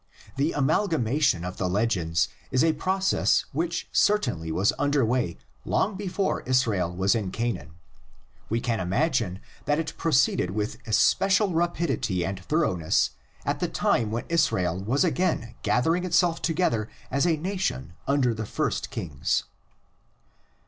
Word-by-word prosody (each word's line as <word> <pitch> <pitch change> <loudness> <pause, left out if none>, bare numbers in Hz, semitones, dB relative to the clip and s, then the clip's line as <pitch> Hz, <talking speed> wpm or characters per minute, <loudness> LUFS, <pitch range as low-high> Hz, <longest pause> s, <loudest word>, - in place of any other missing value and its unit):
The 140 +4 0
amalgamation 145 - +1
of 90 +1 -6
the 90 - -1
legends 90 -5 +1 0.2
is 130 - +2
a 160 -1 +3
process 190 +4 +1
which 170 +4 -2
cer 210 - +4
tainly 85 - -4
was 95 +6 +2
under 145 -2 +2
way 115 -7 0 0.3
long 205 0 0
before 195 0 -1
Israel 110 -9 +1
was 95 +2 +2
in 110 -5 -1
Canaan; 95 -8 -3 0.7
we 115 - +1
can 115 -1 -1
imagine 95 - 0 0.3
that 145 - +2
it 165 - -3
proceeded 140 - +2
with 105 +3 -3
especial 195 - +3
rapidity 165 - 0
and 95 -1 -4
thoroughness 95 - +1 0.3
at - - -1
the - - 0
time 110 -3 +1
when 115 +2 -3
Israel 95 - +1
was 130 - +2
again 170 -9 0
gathering 165 +8 +1
itself 175 -2 +2
together 155 -11 0 0.2
as 140 +5 +2
a 165 -2 +2
nation 155 - -3
under 135 -4 +2
the 110 -1 -5
first - - -2
kings. 70 -3 -1
125 Hz, 140 wpm, -26 LUFS, -, 0.7 s, cer